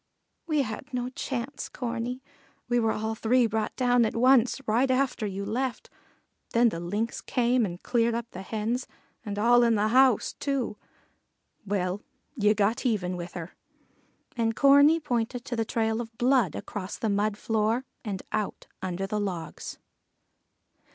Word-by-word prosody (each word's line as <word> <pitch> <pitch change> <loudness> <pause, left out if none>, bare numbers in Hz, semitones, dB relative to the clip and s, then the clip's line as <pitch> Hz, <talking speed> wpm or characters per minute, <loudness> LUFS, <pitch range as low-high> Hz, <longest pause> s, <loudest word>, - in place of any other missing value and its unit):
"We 305 -3 +2
had 235 +5 -7
no 245 0 -1
chance, 260 0 -4
Corney; 245 0 -4 0.4
we 240 0 +2
were 225 -1 +2
all 220 +1 -2
three 240 +3 +3
brought 220 -1 -1
down 245 -1 +3
at 225 - -1
once, 250 +1 +4
right 240 +5 +2
after 260 -4 +1
you 200 0 -4
left. 245 +4 -3 0.6
Then 235 0 +5
the 165 - -5
Lynx 205 +7 -2
came 245 -2 +2
and 175 0 -8
cleared 235 -1 +2
up 235 -1 -2
the 185 - -7
Hens, 225 +5 -2 0.4
and 205 -3 -5
all 240 +3 +5
in 235 -1 +4
the 210 +1 +2
house, 255 -1 +4
too." 275 -6 -1 0.9
"Well, 190 0 -1 0.3
ye 210 -3 +3
got 215 +5 +1
even 195 -8 0
with 175 0 -6
her," 175 0 -7 0.8
and 225 -2 0
Corney 285 +4 +6
pointed 245 -4 -2
to 240 - -3
the 225 -1 0
trail 225 0 0
of 225 -1 -10
blood 245 - +3
across 195 -2 -5
the 225 - -2
mud 205 0 +1
floor 225 +4 0 0.2
and 200 -5 -4
out 215 -2 -2 0.2
under 185 +1 -2
the 210 +2 -2
logs. 180 -6 -5
230 Hz, 160 wpm, -27 LUFS, 210-250 Hz, 0.9 s, Corney